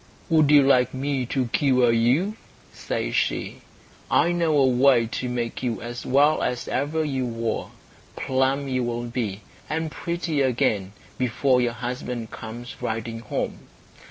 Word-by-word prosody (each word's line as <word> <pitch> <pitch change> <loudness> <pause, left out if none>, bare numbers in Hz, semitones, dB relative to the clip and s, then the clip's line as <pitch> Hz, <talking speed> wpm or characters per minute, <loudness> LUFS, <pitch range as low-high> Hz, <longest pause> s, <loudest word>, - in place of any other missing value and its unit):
"Would 155 -3 +4
you 145 -1 +7
like 130 -2 +3
me 135 -1 -1
to 130 +1 0
cure 125 -2 +3
you?" 130 - +2 0.4
says - - -3
she. - - -1 0.5
"I 175 - +3
know 165 -3 +2
a 135 - +5
way 125 -1 +4
to 125 +2 -4
make 120 -1 -3
you 120 -3 -2
as 120 +1 -7
well 145 +4 +4
as 125 -1 -2
ever 155 +4 -1
you 135 -3 -1
were. 115 -1 -2 0.5
Plump 135 +2 0
you 130 -1 0
will 120 0 -2
be, 115 -4 -3 0.3
and 160 +1 -2
pretty 170 -4 -2
again, 110 -7 +1 0.3
before 125 +1 +2
your 120 -1 0
husband 120 -1 -5
comes 120 +2 -8
riding 115 +1 -3
home." 115 - -4
125 Hz, 150 wpm, -24 LUFS, 120-140 Hz, 0.5 s, you